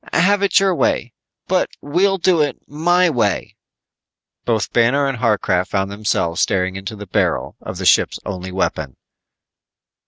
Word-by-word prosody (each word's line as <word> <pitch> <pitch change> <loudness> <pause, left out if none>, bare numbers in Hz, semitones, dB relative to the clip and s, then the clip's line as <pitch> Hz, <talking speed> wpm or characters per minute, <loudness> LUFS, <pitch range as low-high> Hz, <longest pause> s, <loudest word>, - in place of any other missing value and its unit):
Have 200 +4 +3
it 200 0 +4
your 195 -1 +2
way, 120 -7 0 0.3
but - - +1
we'll 190 +7 +1
do 175 -2 +2
it 145 - -1
my 175 +4 +2
way." 115 - -1 0.9
Both 110 -5 -1
Banner 125 +5 +3
and 135 -3 -2
Harcraft 100 -6 +1
found 95 0 -1
themselves 100 -5 -1
staring 95 0 0
into 95 +3 -6
the 105 0 -9
barrel 90 - -1
of - - -7
the - - -5
ship's - - +3
only 95 -2 -5
weapon. 80 -7 -2
115 Hz, 150 wpm, -19 LUFS, -, 0.9 s, it